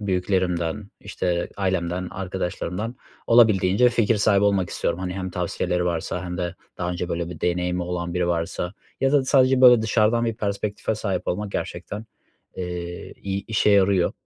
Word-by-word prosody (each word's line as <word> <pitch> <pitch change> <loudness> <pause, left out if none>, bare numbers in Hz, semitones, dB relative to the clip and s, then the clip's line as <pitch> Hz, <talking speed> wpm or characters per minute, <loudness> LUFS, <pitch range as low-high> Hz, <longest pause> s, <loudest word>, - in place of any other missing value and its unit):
büyüklerimden, 95 -1 -1
işte, 85 -1 -2
ailemden 90 -2 -1
arkadaşlarımdan 95 +3 -4 0.3
olabildiğince 110 -1 +5
fikir 115 -2 +2
sahibi 100 -1 +3
olmak 100 -3 +2
istiyorum. - - -1
Hani, 90 -1 -3
hem 95 -1 -4
tavsiyeleri 90 0 -1
varsa 85 +1 -2
hem 90 0 -5
de 85 -1 -2 0.2
daha 90 -1 -1
önce 90 0 -3
böyle 85 -1 -2
bir 80 - -9
deneyimi 90 0 0
olan 85 -1 -3
biri 90 -1 +1
varsa 85 +2 -2 0.3
ya 135 0 +2
da 145 -2 +4
sadece, 130 -1 +4
böyle, 125 -3 +8
dışarıdan 110 +1 +2
bir 115 -1 -1
perspektife 105 0 -2
sahip 100 -4 -3
olmak 105 +3 -2
gerçekten, 105 +2 -5 0.5
eee, 90 -1 -5
iy 100 0 -3
işe 110 -1 +2
yarıyor. 100 -2 +4
95 Hz, 155 wpm, -24 LUFS, 90-105 Hz, 0.5 s, böyle